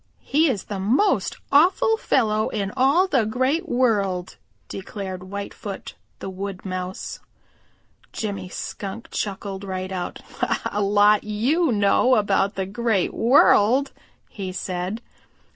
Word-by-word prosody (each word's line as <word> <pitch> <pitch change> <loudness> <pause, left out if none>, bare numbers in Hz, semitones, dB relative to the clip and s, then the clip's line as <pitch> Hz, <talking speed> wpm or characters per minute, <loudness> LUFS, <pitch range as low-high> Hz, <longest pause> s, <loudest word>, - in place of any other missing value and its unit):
"He 310 +2 +3
is 215 -8 -1
the 200 -2 -5
most 220 - +1
awful 370 - +4
fellow 215 - +1
in 200 -2 -2
all 275 +8 +4
the 265 -10 +2
Great 260 - 0
World," 200 -8 +1 0.3
declared 190 -1 -6
Whitefoot 200 +1 -7 0.2
the - - -7
Wood 190 0 -6
Mouse. 185 0 -5 0.9
Jimmy 200 -4 -4
Skunk 200 +4 -6
chuckled 200 -1 -4
right 185 -1 -4
out. 180 -2 -4 0.5
"A 210 - -1
lot 205 +1 +4
you 255 +10 +1
know 210 +4 +3
about 200 -1 +1
the 190 - -2
Great 210 -1 0
World," 255 +1 +4 0.4
he 190 -3 -6
said. 185 +4 -4
205 Hz, 120 wpm, -23 LUFS, 190-250 Hz, 0.9 s, awful